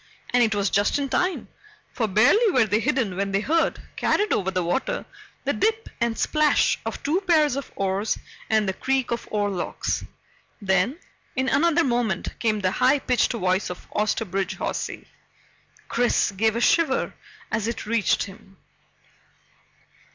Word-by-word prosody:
And 245 - +4
it 220 -3 +3
was 200 -2 0
just 205 +6 +2
in 280 -1 -2
time, 365 +5 0 0.5
for 225 - 0
barely 245 - +4
were 255 - +3
they 210 +1 +1
hidden 225 -4 0
when 195 +1 -1
they 195 - +2
heard, 325 +10 +1 0.2
carried 420 +1 +1
over 190 -2 0
the 185 -1 -1
water, 175 +10 -1 0.4
the - - 0
dip 445 +1 0
and 235 -1 0
splash 305 -1 +2
of - - -5
two 325 +7 +1
pairs 315 -7 +3
of 275 -1 -5
oars 195 +2 -1 0.3
and 215 -2 +2
the 190 - 0
creak 265 +3 -1
of 235 - -3
oarlocks. 205 -4 -2 0.6
Then, 195 - +1 0.4
in 260 +1 0
another 335 +4 +3
moment, 240 - -1
came 215 -2 0
the 185 -1 +1
high 265 +8 +3
pitched 250 -3 +1
voice 185 -3 0
of 180 - -8
Osterbridge 200 -3 -1
Hawsey. - - -4 0.8
Chris 240 -3 +1
gave 220 +3 +1
a 235 - -1
shiver 295 0 +2 0.4
as 225 -1 -1
it 230 - -4
reached 230 -1 +1
him. 195 0 -13
225 Hz, 155 wpm, -24 LUFS, 195-270 Hz, 0.8 s, And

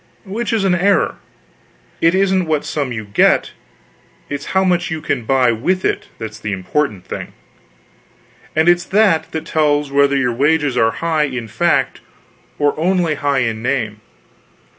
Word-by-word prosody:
Which 225 +6 -3
is 225 -3 +1
an 190 -2 +2
error. 195 +3 +2 0.8
It 165 +2 +4
isn't 190 -2 +2
what 155 -2 0
sum 140 -4 -2
you 110 -3 -5
get, 100 0 +2 0.8
it's 145 0 -4
how 190 - +4
much 180 -1 +1
you 160 -1 -3
can 130 -6 -2
buy 130 -1 +3
with 180 +12 -1
it, - - -1
that's 110 -1 -7
the 105 -1 -3
important 95 +1 -2
thing; - - -7 1.2
and 160 +2 +2
it's 175 +1 +4
that 190 -6 +2
that 160 0 -4
tells 150 -2 +1
whether 140 0 +3
your 125 -3 +1
wages 145 +1 +1
are 115 -2 +3 0.2
high 160 -2 +2
in 125 -5 -5
fact - - 0 0.6
or 145 -1 +2
only 175 -1 +1
high 140 -3 0
in 110 -1 -3
name. 115 -4 -2
145 Hz, 160 wpm, -18 LUFS, 125-175 Hz, 1.2 s, It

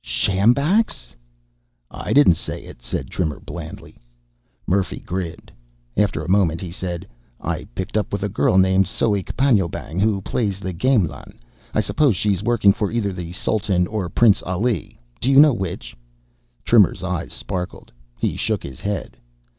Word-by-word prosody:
"Sjambaks?" 120 - +1 0.8
"I - - -5
didn't 140 -10 +6
say - - -6
it," - - -13
said - - -4
Trimmer 80 -5 -2
blandly. 85 -2 -9 0.7
Murphy 95 0 0
grinned. 90 -2 -5 0.4
After 100 -5 +1
a - - -7
moment 90 -4 +2
he 90 -1 -6
said. 90 -1 -5 0.3
"I - - -3
picked 95 +3 -4
up 110 - 0
with 100 -1 -2
a - - +1
girl 95 -2 +2
named 95 0 +4
Soek 100 -1 -1
Panjoebang 100 - +1
who 105 -1 +2
plays 100 0 -2
the 95 -2 -4
gamelan. 105 - 0 0.3
I - - +2
suppose 140 -9 +2
she's 100 -1 0
working 105 -3 +4
for 105 -3 -2
either 110 -4 -1
the 90 -2 -6
Sultan 95 -2 0
or 100 -2 -3
Prince 110 +2 +4
Ali. 105 +6 -2 0.2
Do 125 - 0
you 135 0 +7
know 150 -1 +8
which?" 90 - -5 0.7
Trimmer's 105 -5 +4
eyes 90 -2 -3
sparkled. 90 -2 -5 0.3
He - - -1
shook - - -1
his 65 -2 -8
head. 100 -1 -4
95 Hz, 155 wpm, -21 LUFS, 90-110 Hz, 0.8 s, know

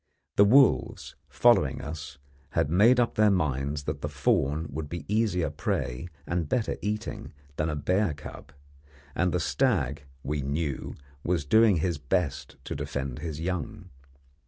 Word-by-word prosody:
The 100 - +6
wolves, 130 +4 +3
following - - +3
us, 75 -2 -7 0.4
had 70 - +1
made 115 +8 +5
up 120 - +2
their 105 0 +4
minds 70 -5 0
that - - -4
the 75 - -3
fawn 70 +2 +1
would 75 0 -5
be 85 - -6
easier 100 -7 +1
prey 70 0 -2 0.2
and 85 -3 -2
better 120 -4 0
eating 105 -1 -4 0.2
than 80 +1 0
a 75 - -2
bear 90 +3 +1
cub; 70 - -10 0.6
and 90 +4 +1
the 90 - 0
stag, 75 - 0 0.2
we 75 +1 -2
knew, 70 +1 -3 0.3
was 85 -4 0
doing 110 +5 +5
his 85 -1 -1
best 75 -1 -2
to - - -5
defend 65 -2 -4
his 80 -3 -5
young. 90 -1 -4
80 Hz, 150 wpm, -27 LUFS, 70-100 Hz, 0.6 s, The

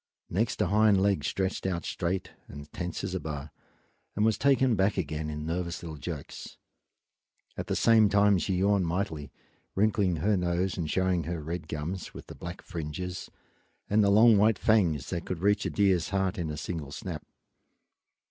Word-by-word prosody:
Next 110 +6 0
a - - +2
hind 105 +1 +4
leg 100 0 +2
stretched 95 -1 -1
out 85 -3 -2
straight 90 +1 -2 0.2
and 75 +1 -11
tense 90 0 -4
as 95 -2 -3
a 95 - -1
bar, 75 -2 -6 0.6
and 105 - +2
was 110 -1 +3
taken 130 0 +3
back 95 +1 +1
again 80 -3 -2
in 75 0 -5
nervous 85 +1 -3
little 80 -2 -6
jerks. 75 -1 -7 1.0
At - - -5
the - - -1
same 110 -2 +5
time 100 -1 +4
she 95 +2 -1
yawned 95 -1 +2
mightily, 80 -5 -3 0.4
wrinkling 100 -3 +2
her 100 +7 +1
nose 90 +1 0
and 80 -4 -3
showing 95 -3 +1
her 85 +1 -3
red 80 +2 -5
gums 80 +5 -5
with - - -9
the - - -10
black - - -8
fringes 85 +3 -5 0.6
and 105 +1 +5
the 100 - +4
long 110 +1 +6
white 110 0 +4
fangs 85 - +2
that 85 -2 -2
could 90 - -3
reach 105 +1 +2
a - - -1
deer's 95 -4 +2
heart 95 -1 0
in 80 -3 -2
a 75 - -4
single 75 -4 -5
snap. - - -6
90 Hz, 180 wpm, -29 LUFS, 80-100 Hz, 1.0 s, long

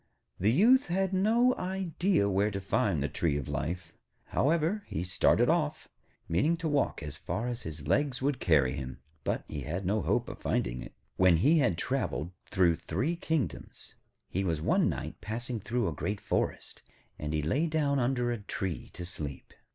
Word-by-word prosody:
The 100 - +3
Youth 240 - +5
had 190 +2 0
no 230 +6 +4
idea 185 - 0
where 100 +1 +2
to 100 -1 -3
find 95 -5 +1
the - - +1
tree 75 +1 0
of 70 - -4
life. 85 0 -3 0.4
However, 165 +7 +2
he 80 - -3
started 90 - +3
off, - - 0 0.4
meaning 125 - +2
to 165 -1 -2
walk 145 - 0
as 75 0 -6
far 110 - -3
as 120 -1 -3
his 75 -2 -7
legs 140 -3 +1
would 135 -1 0
carry 70 -6 +3
him; 65 -3 -5 0.3
but - - -1
he 75 - -5
had 85 +9 -4
no 105 +3 +1
hope - - +1
of - - -7
finding - - -1
it. - - -10 0.2
When 90 -2 +6
he 150 - +4
had 95 - +2
travelled 80 +5 -2 0.2
through 85 -3 +3
three 125 - -1
kingdoms, 160 -5 -3 0.3
he 95 - -1
was 85 -5 0
one 80 - +3
night - - -5
passing 120 +2 -3
through 115 +2 -1
a 80 - -1
great 100 +7 -3
forest, - - -2 0.4
and 75 0 -3
he 75 -1 0
lay 140 - +1
down 145 -3 +1
under 120 -1 +1
a 120 - -2
tree 95 -4 -4
to 90 - -6
sleep. 75 -6 -6
105 Hz, 180 wpm, -30 LUFS, -, 0.4 s, When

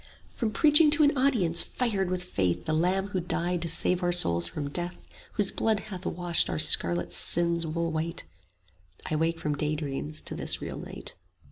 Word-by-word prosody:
From 230 - -2
preaching 300 +6 +5
to 310 - +4
an 290 0 +3
audience 230 -12 +2
fired 205 -7 -2
with 180 0 -3
faith 95 - -2
The 155 - -1
Lamb 185 +5 0
who 190 - -2
died 175 0 -1
to 170 - -3
save 180 +3 0
our 175 0 +1
souls 85 - +3
from 140 - -5
death, 175 +3 -2 0.4
Whose 205 -2 +4
blood 220 -2 0
hath 185 -1 -6
washed 175 -2 +1
our - - -2
scarlet 85 +3 +3
sins 170 - +1
wool 165 +1 -2
white: 165 +2 -3 0.8
35 - - -8
I - - +1
wake 165 +1 0
from 150 - -2
daydreams 150 0 -3
to - - -7
this - - -1
real - - -6
night. - - -9
170 Hz, 190 wpm, -27 LUFS, 155-190 Hz, 0.8 s, preaching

